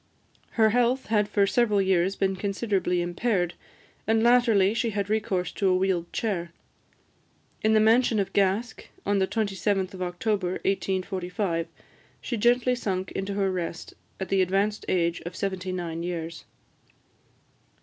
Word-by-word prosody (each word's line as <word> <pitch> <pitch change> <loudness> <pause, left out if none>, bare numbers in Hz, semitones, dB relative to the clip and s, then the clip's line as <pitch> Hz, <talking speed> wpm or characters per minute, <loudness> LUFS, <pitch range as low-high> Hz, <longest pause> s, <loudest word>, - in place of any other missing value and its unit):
Her 220 -2 +4
health 245 +3 +2
had 210 -1 +2
for 205 -1 +3
several 210 -1 +2
years 190 0 +2
been 195 0 0
considerably 195 -3 -1
impaired, 175 0 0 0.5
and 225 0 +3
latterly 230 -5 +4
she 230 0 0
had 205 -1 -2
recourse 190 -5 0
to 200 - 0
a 185 - +3
wheeled 185 -2 0
chair. 180 -7 -2 1.1
In 220 0 +3
the 215 - +5
mansion 225 +1 +4
of 195 - -2
Gask, 200 +4 0 0.2
on 205 0 +2
the 190 - +2
27th 195 -3 -1
of 185 - -8
October 180 +1 -1
1845, 185 -2 -1 0.5
she 240 - -4
gently 240 +3 +3
sunk 190 -6 -3
into 195 +1 -3
her 195 -1 +1
rest, 170 -2 -5 0.3
at 190 - -4
the 195 -1 +3
advanced 195 +3 0
age 170 -2 0
of 175 +1 -7
seventy 190 -1 -3
nine 170 -2 -4
years. 170 -1 -5
195 Hz, 145 wpm, -26 LUFS, 185-215 Hz, 1.1 s, the